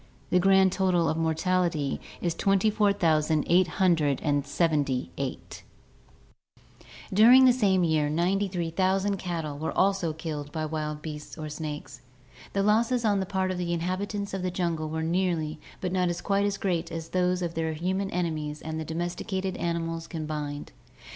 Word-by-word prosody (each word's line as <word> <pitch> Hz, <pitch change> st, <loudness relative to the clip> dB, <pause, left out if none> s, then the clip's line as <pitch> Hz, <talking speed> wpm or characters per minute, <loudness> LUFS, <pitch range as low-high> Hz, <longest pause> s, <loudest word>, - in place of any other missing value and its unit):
The 180 Hz, -, +5 dB
grand 190 Hz, 0 st, +5 dB
total 180 Hz, -3 st, +2 dB
of 160 Hz, -, +1 dB
mortality 165 Hz, -2 st, 0 dB, 0.2 s
is 170 Hz, -2 st, 0 dB
24,878. 185 Hz, -5 st, +2 dB
106 150 Hz, -5 st, +1 dB
ORGANIC 145 Hz, -, +1 dB
EVOLUTION -, -, -6 dB, 1.5 s
"During 240 Hz, +6 st, +8 dB
the 250 Hz, -, +7 dB
same 195 Hz, -7 st, +2 dB
year 155 Hz, -3 st, +2 dB
93,000 190 Hz, +2 st, 0 dB
cattle 165 Hz, -6 st, -4 dB
were 160 Hz, +1 st, -3 dB
also 195 Hz, -4 st, +2 dB
killed 155 Hz, -2 st, -5 dB
by 155 Hz, 0 st, -2 dB
wild 150 Hz, -1 st, -4 dB
beasts 150 Hz, -1 st, -7 dB
or 155 Hz, -1 st, -5 dB
snakes. 150 Hz, -4 st, -6 dB, 0.5 s
"The 200 Hz, -, +1 dB
losses 230 Hz, +3 st, +2 dB
on 205 Hz, -2 st, +3 dB
the 190 Hz, -, -2 dB
part 190 Hz, -1 st, 0 dB
of 180 Hz, -, -3 dB
the 175 Hz, -1 st, -1 dB
inhabitants 195 Hz, +4 st, -3 dB
of 195 Hz, -, -2 dB
the 185 Hz, -, -1 dB
jungle 170 Hz, -3 st, -2 dB
were 160 Hz, +1 st, -2 dB
nearly 165 Hz, -3 st, 0 dB, 0.2 s
but 185 Hz, -, -3 dB
not 180 Hz, -1 st, +1 dB
quite 200 Hz, 0 st, +1 dB
as 200 Hz, -1 st, -2 dB
great 175 Hz, -3 st, -1 dB
as 165 Hz, 0 st, -5 dB
those 180 Hz, 0 st, +1 dB
of 170 Hz, -1 st, -3 dB
their 160 Hz, -1 st, -1 dB
human 190 Hz, +5 st, -1 dB
enemies 155 Hz, -4 st, -2 dB
and 160 Hz, 0 st, -4 dB
the 160 Hz, -, -4 dB
domesticated 180 Hz, +4 st, -3 dB
animals 165 Hz, -1 st, -2 dB
combined. 150 Hz, -3 st, -5 dB
170 Hz, 150 wpm, -27 LUFS, 155-190 Hz, 1.5 s, During